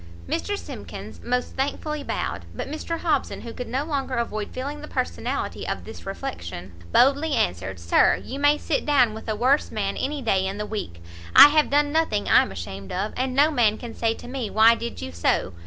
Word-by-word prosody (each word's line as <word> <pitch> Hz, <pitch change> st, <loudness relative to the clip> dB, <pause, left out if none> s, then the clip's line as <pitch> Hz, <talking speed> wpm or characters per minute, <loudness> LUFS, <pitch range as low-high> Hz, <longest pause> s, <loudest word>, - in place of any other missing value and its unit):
Mr 410 Hz, -, -2 dB
Simkins -, -, -9 dB
most 250 Hz, +1 st, -1 dB
thankfully 290 Hz, +2 st, -2 dB
bowed; -, -, -3 dB
but -, -, -4 dB
Mr 315 Hz, +3 st, -4 dB
Hobson, -, -, 0 dB
who 230 Hz, -1 st, -8 dB
could 250 Hz, -, -6 dB
no 260 Hz, +5 st, -1 dB
longer 275 Hz, -4 st, -2 dB
avoid 215 Hz, -3 st, -2 dB
feeling 280 Hz, +3 st, -5 dB
the -, -, -8 dB
personality -, -, -3 dB
of -, -, -3 dB
this -, -, -10 dB
reflection, 95 Hz, -, -6 dB, 0.2 s
boldly 285 Hz, -, +4 dB
answered, 90 Hz, +1 st, -1 dB
"Sir, 85 Hz, 0 st, +4 dB
you 270 Hz, -, -7 dB
may 290 Hz, +1 st, +4 dB
sit 300 Hz, -1 st, -1 dB
down 260 Hz, -7 st, +3 dB
with 220 Hz, +1 st, -8 dB
a 215 Hz, -, 0 dB
worse 260 Hz, +7 st, +2 dB
man -, -, -2 dB
any 285 Hz, 0 st, -2 dB
day 190 Hz, -4 st, +2 dB
in 195 Hz, +1 st, -4 dB
the 210 Hz, -, -3 dB
week! 85 Hz, -, -6 dB, 0.3 s
I -, -, +12 dB
have 305 Hz, 0 st, +3 dB
done 290 Hz, +1 st, +2 dB
nothing 310 Hz, -10 st, +1 dB
I'm -, -, +5 dB
ashamed 95 Hz, +2 st, -7 dB
of, 195 Hz, +4 st, -2 dB
and 255 Hz, 0 st, -1 dB
no 295 Hz, +3 st, +5 dB
man 225 Hz, -6 st, +3 dB
can 235 Hz, -2 st, -8 dB
say 225 Hz, -1 st, 0 dB
to -, -, -11 dB
me 250 Hz, -4 st, -4 dB
why 220 Hz, +2 st, +6 dB
did 235 Hz, -, -5 dB
you 85 Hz, -, -5 dB
so? 85 Hz, 0 st, 0 dB
245 Hz, 205 wpm, -24 LUFS, 205-285 Hz, 0.3 s, I